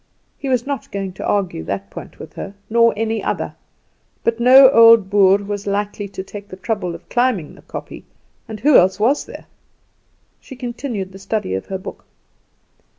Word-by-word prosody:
He 275 - -4
was 250 -2 +1
not 280 -1 -5
going 195 -2 -4
to - - -8
argue 190 - -1
that 100 +2 -5
point - - -10
with - - -11
her, 200 +1 -8 0.2
nor 230 0 +5
any 225 0 -2
other; - - -3 0.7
but 230 0 0
no 260 +2 +8
old 230 -5 +6
Boer 195 -1 +5
was 205 0 -6
likely 205 0 -2
to 190 - -7
take 205 +1 -10
the 185 - -9
trouble 190 -3 -3
of 170 - -14
climbing 240 - 0
the - - -16
kopje, - - -9 0.5
and 220 -2 -7
who 295 -1 +6
else 190 +2 +3
was 255 +7 +2
there? - - -11 0.9
She 265 - -12
continued 240 -5 -5
the 195 - -12
study 205 - -3
of 95 - -4
her 190 - -3
book. 185 - -10
205 Hz, 180 wpm, -19 LUFS, 190-235 Hz, 0.9 s, no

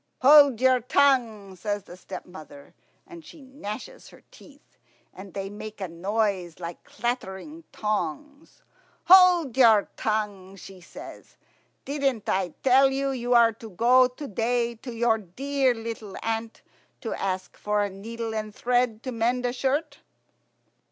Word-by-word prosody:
"Hold 280 -3 +7
your 260 0 +4
tongue," 235 -6 +1
says 205 +1 -3
the 175 - -12
stepmother, 180 -6 -11 0.3
and 340 -2 -12
she 310 -2 -14
gnashes 260 - -8
her - - -18
teeth, - - -19 0.3
and 190 0 -12
they 195 -1 -4
make 210 +1 -9
a 190 - -3
noise 185 0 -2
like 170 -1 -7
clattering 240 - -5
tongs. 215 - -4 0.4
"Hold 355 -7 +6
your 225 -6 +5
tongue," 205 -3 -3
she 190 -1 -13
says. 170 - -12 0.5
"Didn't 275 -6 -1
I 185 -3 -1
tell 270 +1 +5
you 275 0 -1
you 245 -1 0
are 230 -1 +5
to 225 +1 -11
go 245 +6 +4
to 255 +3 -9
day 235 +2 -1
to 240 +2 -9
your 230 -1 +1
dear 260 +7 -1
little 225 -3 -7
aunt 225 0 -4 0.4
to 225 - -4
ask 185 -1 -4
for 210 0 -1
a 205 - -2
needle 225 +3 -6
and 215 -1 -5
thread 245 -2 0
to 255 - -4
mend 245 +2 0
a 245 - -1
shirt?" 285 +3 -2
230 Hz, 145 wpm, -25 LUFS, 200-260 Hz, 0.5 s, Hold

